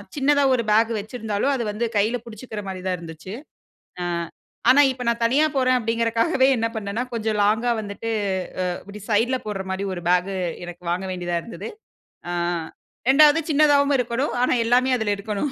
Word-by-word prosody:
சின்னதா 285 0 +3
ஒரு 235 - -1
பேக் 225 +2 +4
வச்சிருந்தாலும், 215 +3 -2
அது 245 - -2
வந்து 230 +3 -2
கையில 220 +4 +1
புடிச்சுக்கிற 220 -1 -7
மாரி 185 -1 -6
தான் 185 - 0
இருந்துச்சு. 165 +3 -9 0.7
அ - - -2 0.7
ஆனா, 285 +2 +6
இப்ப 250 -1 -7
நான் 235 0 -1
தனியா 275 +7 +3
போறேன் 255 -1 +3
அப்பிடிங்கிறக்காகவே 230 +5 +1
என்ன 230 0 +1
பண்ணேன்னா, 215 +3 -3
கொஞ்சம் 220 -2 -1
லாங்கா 225 +3 +2
வந்துட்டு. 205 +2 -5 0.6
அ 180 - -1
இப்பிடி 205 +1 -10
சைட்ல 240 +5 +2
போட்ற 200 -2 -3
மாரி 190 +1 -2
ஒரு 175 - -7
பேக் 180 +2 +2 0.3
எனக்கு 175 0 -10
வாங்க 180 +2 -2
வேண்டியதா 175 -1 -2
இருந்துது. 230 - -7 0.6
ஆ, - - -2 0.8
2வது 300 +3 +7
சின்னதாவும் 285 -1 +4
இருக்கணும். 245 +3 -1
ஆனா, - - +3
எல்லாமே 250 +2 +3
அதுல 220 -3 -1
இருக்கணும் 210 +6 -3
230 Hz, 160 wpm, -23 LUFS, 200-255 Hz, 0.8 s, 2வது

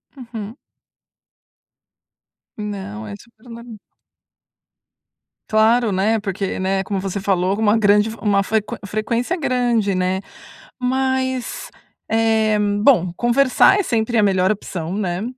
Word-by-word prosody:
Uhum. 230 -2 -8 2.0
Não 190 - -6
é 100 - -7
super 235 0 -21
norm 230 -1 -10 1.7
Claro, 220 +1 +3
né. 215 +4 +1
Porque, 195 -2 -3
né 190 +1 0
,como 195 0 -3
você 195 0 -4
falou 190 0 0
uma 220 0 +3
grande 210 0 +3
f 225 - -8
uma 200 -2 +2
fre 220 +2 +1 0.2
frequência 230 - -2
grande, 240 - 0
né. 185 +1 0 0.6
Mas, 260 0 -1 0.4
eh, 220 -1 +2
bom, 205 -3 +2
conversar 255 +10 +4
é 405 - +1
sempre 230 -3 0
a 210 - +4
melhor 190 -1 +2
opção, 180 -4 -5
né. 185 -1 -2
215 Hz, 115 wpm, -20 LUFS, 195-235 Hz, 2.0 s, conversar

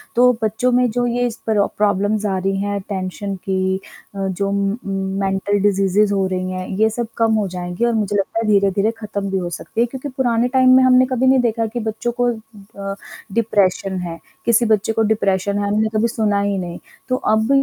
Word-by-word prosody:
तो 250 +1 +6
बच्चों 220 +4 +1
में 250 0 +3
जो 245 +2 -1
ये 245 +1 0
इस 235 -1 -6
तरह 210 -2 +3
प्रॉब्लम्स 205 +1 +1
आ 195 -2 0
रही 195 +1 -1
हैं 205 0 -2
टेंशन 195 +1 -4
की 190 0 -1 0.4
अ, 195 -1 -2
जो 195 +1 -2
म 200 +1 0 0.5
मेंटल 195 +1 0
डिजीज़ीज़ 200 +1 +2
हो 195 -1 +1
रही 185 0 -2
हैं 185 0 -4
ये 220 0 +4
सब 235 +1 -3
कम 225 -1 +3
हो 210 -2 0
जाएँगे 180 +4 -3
और 235 - +1
मुझे 210 -2 0
लगता 200 +3 -1
है 225 - -1
धीरे-धीरे 200 +1 +2
ख़त्म 205 -3 -4
भी 195 - 0
हो 175 -2 -2
सकती 195 +6 -4
है - - +4
क्योंकि 265 +3 -6
पुराने 240 -2 +2
टाइम 260 -1 +5
में 260 - +5
हमने 255 0 +5
कभी 255 0 +1
नहीं 265 0 +5
देखा 230 -1 0
कि 240 - -2
बच्चों 220 +2 -2
को 245 - +3 0.6
अ, - - -9 0.4
डिप्रेशन 195 -4 +1
है 165 -1 -7 0.3
किसी 235 0 +4
बच्चे 220 0 +1
को 225 - +1
डिप्रेशन 200 -1 0
है 205 - -1
हमने 215 +2 +1
कभी 215 +2 +3
सुना 215 -3 0
ही 200 -1 0
नहीं। 175 -2 -5 0.3
तो 255 - +2
अब 220 -3 +1
205 Hz, 210 wpm, -19 LUFS, 195-230 Hz, 0.6 s, तो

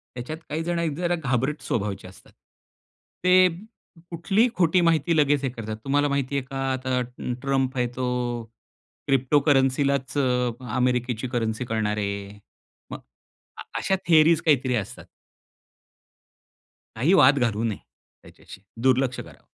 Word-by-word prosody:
त्याच्यात 125 +6 -6
काही 160 +2 -2
जण 170 0 -2
एक 165 -3 -1
जरा 175 0 0
घाबरट 135 -1 -1
स्वभावचे 100 -3 -3
असतात. 95 - -17 0.9
ते 185 0 +6 0.6
कुठलीही 195 +8 +1
खोटी 180 0 +3
माहिती 165 -1 +2
लगेच 145 -1 +2
हे 135 - 0
करतात. 110 -3 -6
तुम्हाला 145 +1 +1
माहिती 140 -1 -1
आहे 135 - -2
का 135 +1 -7 0.2
आता 130 0 -2
अ, - - 0 0.4
ट्रम्प 135 -1 -1
आहे 125 -1 +1
तो 130 0 -2 0.4
अ, - - -17 0.6
क्रिप्टोकरन्सीलाच 135 0 +2
अ, 125 -3 +1 0.2
अमेरिकेची 125 -1 0
करन्सी 120 -1 -2
करणार 110 -2 -1
आहे. 100 0 -4 0.5
मग, - - -6 0.6
आ - - -7 0.2
अशा 195 - +1
थिअरीज 160 -1 +5
काहीतरी 130 -5 +2
असतात. 105 -5 -5 1.9
काही 135 +11 +2
वाद 145 -5 +6
घालू 115 -3 0
नये 110 -3 -1 0.5
त्याच्याशी. 95 - -14 0.2
दुर्लक्ष 130 -1 +2
करावं. - - -12
135 Hz, 135 wpm, -24 LUFS, 120-150 Hz, 1.9 s, ते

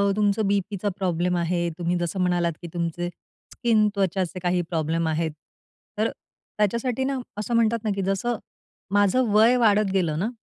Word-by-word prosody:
तुमचं 205 0 +2
बीपीचा 200 0 0
प्रॉब्लेम 180 -1 0
आहे, 175 +1 0 0.2
तुम्ही 175 0 0
जसं 175 +2 -2
म्हणालात, 175 -2 +1
की 175 - -7
तुमचे 175 0 -2 0.4
स्किन, 220 -3 +3
त्वचाचे 190 -2 -1
काही 180 0 +2
प्रॉब्लेम 165 0 0
आहेत. 160 0 0 0.7
तर 215 +2 +2 0.5
त्याच्यासाठी 235 +5 0
ना 270 0 -1 0.2
असं 215 +3 -3
म्हणतात 230 -1 +2
ना, 220 - -1
की 195 - -1
जसं 210 +5 0 0.6
माझं 205 +5 +3
वय 225 +4 +6
वाढत 210 -4 +3
गेलं 170 -5 +1
ना 210 +6 0
195 Hz, 155 wpm, -25 LUFS, 175-215 Hz, 0.7 s, वय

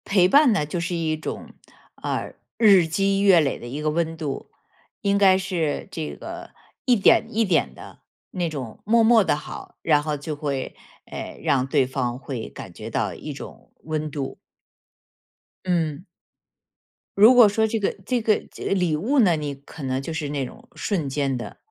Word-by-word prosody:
陪 190 -3 +4
伴 280 +3 +6
呢， 195 -8 +1
就 160 +4 -3
是 175 +1 -2
一 160 -2 -1
种， 155 - -6 0.5
呃， - - -3 0.2
日 200 -6 +6
积 195 +4 +1
月 195 -4 +6
累 140 -4 0
的 - - -10
一 135 +5 -5
个 155 0 0
温 165 +1 -1
度。 150 -4 -5 0.5
应 200 0 +2
该 190 -2 +5
是 175 -6 -2
这 160 -3 -5
个 345 +1 -8 0.3
一 250 -2 +4
点 200 - +5
一 225 +1 +1
点 165 - +1
的， - - -12 0.3
那 175 -2 -1
种 130 -8 -7
默 230 +2 +4
默 225 -1 +6
的 185 - +1
好， 150 - -9
然 150 -2 +3
后 150 0 -2
就 150 +2 -5
会， 140 -3 -3 0.3
呃， - - -8
让 135 -4 +2
对 135 -2 +2
方 125 -2 -2
会 130 -4 -6
感 - - -10
觉 - - -8
到 - - -1
一 - - -7
种 - - -11
温 155 -1 -3
度。 140 -2 -5 1.3
嗯。 170 -2 -1 1.1
如 220 +5 +8
果 240 -4 +8
说 220 +2 +1
这 220 0 -2
个 200 - -1
这 245 +3 0
个 215 -1 +2
介 - - -4
礼 180 -5 +1
物 230 - 0
呢， 180 -8 +4
你 145 -2 -4
可 140 +3 -12
能 130 0 -2
就 165 - -5
是 160 -2 -3
那 140 -2 -2
种 - - -12
瞬 170 -9 -2
间 135 -1 -1
的。 110 -5 -8
160 Hz, 195 characters per minute, -23 LUFS, 145-200 Hz, 1.3 s, 如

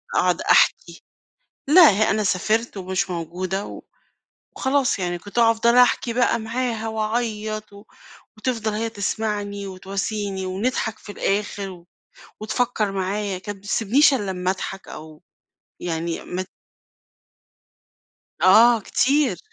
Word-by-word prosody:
اقعُد - - +2
أحكي. - - +2 0.7
لأ، 330 -2 +8
ه 215 +2 +2
أنا 215 +1 0
سافرت 215 +4 0
ومش 190 0 -2
موجودة 180 +3 -3
و - - -9 0.8
وخلاص 265 -4 +1
يعني، 175 -1 -2
كنت 200 +5 -12
أفضل 230 +1 +4
أحكي 245 -1 +4
بقى 240 -1 +2
معاها 230 0 -3
واعيط، 215 -1 -3
و 200 - -13 0.5
وتفضل 220 -2 -2
هي 225 +2 -2
تسمعني 205 -1 -3
وتواسيني، 195 +1 -4
ونضحك 215 +3 -2
في 205 - -10
الآخر 200 0 -2
و 175 -2 -13 0.5
وتفكّر 220 -2 -1
معايّا. 195 0 -2
كانت 205 +1 -7
ما 195 - -23
تسبنيش 235 +8 +3
الّا 205 -7 -1
أمّا 180 0 -1
اضحك 195 0 -6
أو 155 +1 -11 0.6
يعني 165 -1 -3
مت 185 +1 -4 1.9
آه، 225 +6 +6
كتير. 280 +6 +1
210 Hz, 120 wpm, -22 LUFS, 190-230 Hz, 1.9 s, لأ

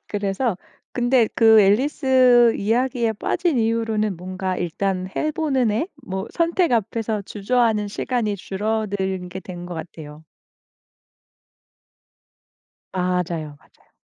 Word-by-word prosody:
그래서 205 +1 -1 0.4
근데 245 -1 +3
그 220 -2 +6
앨리스 250 +2 +4
이야기에 235 +2 0
빠진 330 - 0
이후로는 220 -3 0
뭔가 185 +1 -4
일단 185 +2 -2
해 310 - 0
보는 275 -7 0
애? 230 - -1
뭐 190 -2 -4
선택 340 -1 +1
앞에서 220 -1 -1
주저하는 215 +1 0
시간이 215 -1 -2
줄어들게 190 -2 -3
된 175 -1 -8
것 175 - -6
같아요. 155 -2 -9 2.7
맞아요, 180 -5 -2
맞아요. - - -29
210 Hz, 235 characters per minute, -22 LUFS, 185-245 Hz, 2.7 s, 그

